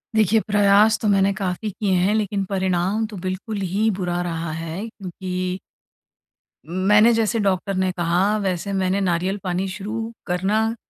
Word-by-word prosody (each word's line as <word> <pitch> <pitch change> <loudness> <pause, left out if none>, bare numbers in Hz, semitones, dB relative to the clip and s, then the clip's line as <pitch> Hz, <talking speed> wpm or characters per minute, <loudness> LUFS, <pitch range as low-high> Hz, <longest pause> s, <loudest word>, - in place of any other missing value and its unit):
देखिए 220 0 +4
प्रयास 205 +1 +4
तो 215 - 0
मैंने 195 -1 +3
काफ़ी 190 +2 -3
किए 205 0 -2
हैं। 185 +3 +2
लेकिन 205 -2 0
परिणाम 190 +2 0
तो 210 -2 -9
बिल्कुल 190 +4 -3
ही 200 +5 +1
बुरा 175 -1 -1
रहा 165 -2 -3
है 165 +3 -5
क्योंकि 185 -3 -5 1.1
मैंने, 210 +6 +4
जैसे 225 0 +1
डॉक्टर 195 -1 0
ने 185 0 +1
कहा, 180 +5 +2
वैसे 195 -1 -2
मैंने 190 0 +1
नारियल 185 +1 0
पानी 185 +1 -1
शुरू 215 +4 -5 0.2
करना 210 +5 0
195 Hz, 150 wpm, -22 LUFS, 180-210 Hz, 1.1 s, देखिए